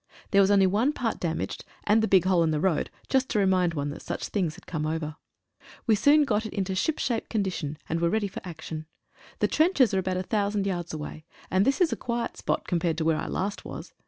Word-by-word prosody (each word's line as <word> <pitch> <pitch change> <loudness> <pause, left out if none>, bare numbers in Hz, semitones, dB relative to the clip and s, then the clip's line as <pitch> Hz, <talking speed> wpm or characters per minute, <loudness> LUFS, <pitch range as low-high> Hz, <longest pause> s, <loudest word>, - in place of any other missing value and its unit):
There 200 - +6
was 195 - +4
only 200 -1 +5
one 215 +10 +2
part 240 -5 -2
damaged, 165 -2 -3 0.2
and 215 +2 +4
the 220 - +2
big 190 -4 +4
hole 185 -2 +4
in 165 - +3
the 155 -1 0
road 175 -1 +1 0.2
just 265 -1 +1
to - - 0
re 200 - +4
mind 180 -3 +2
one 145 0 -2
that - - -8
such - - -4
things 175 -7 -1
had 190 - -15
come 155 -3 -2
over. 155 -1 -3 0.7
We 225 - +4
soon 285 +8 +5
got 220 -6 +1
it 220 - -6
into 190 -2 -1
ship 260 +11 0
shape 235 -3 -1
condition, 185 -8 -2
and 165 +1 -1
were 170 - +3
ready 215 +2 +1
for 195 - -8
action. 155 -2 -7 0.5
The - - +4
trenches 310 - +3
are 190 - +3
about 185 0 -1
1,000 200 +2 0
yards 175 -3 -2
away, 155 0 -6 0.3
and 190 +2 +3
this 275 - +2
is 355 -4 +3
a - - -1
quiet 235 -1 -3
spot - - -2
compared 170 -2 0
with 160 - 0
where 160 -1 +3
I - - -3
last 200 +2 -3
was. - - -8
190 Hz, 240 wpm, -27 LUFS, 165-220 Hz, 0.7 s, There